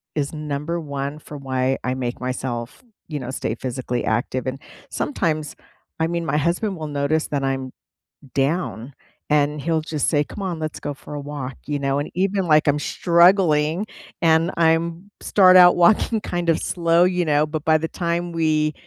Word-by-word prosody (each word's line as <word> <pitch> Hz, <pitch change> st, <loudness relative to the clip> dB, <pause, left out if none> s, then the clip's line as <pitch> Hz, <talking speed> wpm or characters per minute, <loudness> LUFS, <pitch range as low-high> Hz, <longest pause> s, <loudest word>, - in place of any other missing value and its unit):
is 145 Hz, 0 st, -2 dB
number 150 Hz, +2 st, -3 dB
1 140 Hz, -1 st, -5 dB
for 150 Hz, -1 st, -10 dB
why 130 Hz, -1 st, -1 dB
I 125 Hz, -, -1 dB
make 125 Hz, -2 st, -4 dB
myself, 125 Hz, -, -4 dB, 0.2 s
you 150 Hz, -2 st, -4 dB
know, 125 Hz, -1 st, -6 dB
stay 115 Hz, -4 st, -3 dB
physically 125 Hz, 0 st, -3 dB
active. 120 Hz, +3 st, -1 dB
And 130 Hz, +1 st, -3 dB, 0.3 s
sometimes, 155 Hz, -, -2 dB, 0.4 s
I 160 Hz, -, +2 dB
mean, 170 Hz, 0 st, -2 dB
my 150 Hz, -, 0 dB
husband 180 Hz, +6 st, 0 dB
will 155 Hz, -1 st, -5 dB
notice 145 Hz, +2 st, 0 dB
that 140 Hz, -2 st, -2 dB
I'm 135 Hz, -1 st, -2 dB, 0.6 s
down, 140 Hz, -3 st, -1 dB, 0.4 s
and 150 Hz, 0 st, +2 dB
he'll 160 Hz, +1 st, 0 dB
just 155 Hz, -2 st, -1 dB
say, 150 Hz, -2 st, +2 dB
"Come 200 Hz, -, -9 dB
on. 180 Hz, -4 st, -3 dB
Let's 155 Hz, -1 st, -4 dB
go 145 Hz, -, -3 dB
for 145 Hz, -, -11 dB
a 145 Hz, -, -4 dB
walk." 140 Hz, -3 st, -6 dB
You 145 Hz, -1 st, -1 dB
know? 140 Hz, 0 st, 0 dB
And 145 Hz, -, -4 dB
even, 195 Hz, 0 st, 0 dB
like, 155 Hz, -1 st, +4 dB
I'm 145 Hz, +1 st, +3 dB
struggling, 170 Hz, 0 st, +3 dB, 0.4 s
and 165 Hz, 0 st, +3 dB
I'm 170 Hz, +3 st, +1 dB
start 185 Hz, -2 st, +5 dB
out 180 Hz, -1 st, +8 dB
walking 215 Hz, +5 st, +4 dB
kind 175 Hz, -1 st, -2 dB
of 160 Hz, -, +4 dB
slow. 170 Hz, 0 st, +2 dB
You 180 Hz, -1 st, +1 dB
know? 150 Hz, 0 st, +3 dB
But 155 Hz, 0 st, -5 dB
by 160 Hz, 0 st, +5 dB
the 160 Hz, +1 st, -3 dB
time 170 Hz, 0 st, -2 dB
we, 155 Hz, -2 st, +1 dB
155 Hz, 180 wpm, -22 LUFS, 140-170 Hz, 0.6 s, out